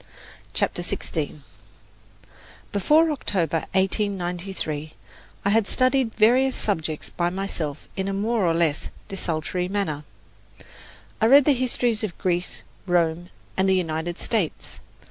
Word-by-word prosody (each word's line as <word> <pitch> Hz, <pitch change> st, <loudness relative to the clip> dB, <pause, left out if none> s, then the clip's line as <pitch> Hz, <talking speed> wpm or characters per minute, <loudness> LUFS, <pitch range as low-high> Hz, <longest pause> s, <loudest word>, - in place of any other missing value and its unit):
CHAPTER -, -, 0 dB
XVI -, -, -3 dB, 1.3 s
Before 305 Hz, -, +4 dB
October, 170 Hz, -, -1 dB
1893, 185 Hz, -5 st, -1 dB, 0.5 s
I -, -, +4 dB
had 220 Hz, -1 st, +3 dB
studied 255 Hz, -2 st, +2 dB
various 250 Hz, +4 st, +4 dB
subjects 160 Hz, -6 st, -2 dB
by 175 Hz, 0 st, 0 dB
myself 175 Hz, -6 st, -3 dB
in 190 Hz, 0 st, -2 dB
a -, -, 0 dB
more 220 Hz, +2 st, +1 dB
or 165 Hz, -, +2 dB
less 165 Hz, -3 st, +1 dB, 0.2 s
desultory 180 Hz, -1 st, -2 dB
manner. 185 Hz, -7 st, -2 dB, 1.2 s
I 220 Hz, -, +5 dB
read 275 Hz, +3 st, +8 dB
the 295 Hz, -, +5 dB
histories 245 Hz, -3 st, +1 dB
of 200 Hz, -5 st, -3 dB
Greece, 180 Hz, -1 st, -1 dB, 0.2 s
Rome 175 Hz, 0 st, +1 dB, 0.3 s
and 190 Hz, 0 st, +2 dB
the 190 Hz, -, +5 dB
United 170 Hz, -1 st, -1 dB
States. 210 Hz, -9 st, -2 dB
190 Hz, 120 wpm, -24 LUFS, 170-220 Hz, 1.3 s, read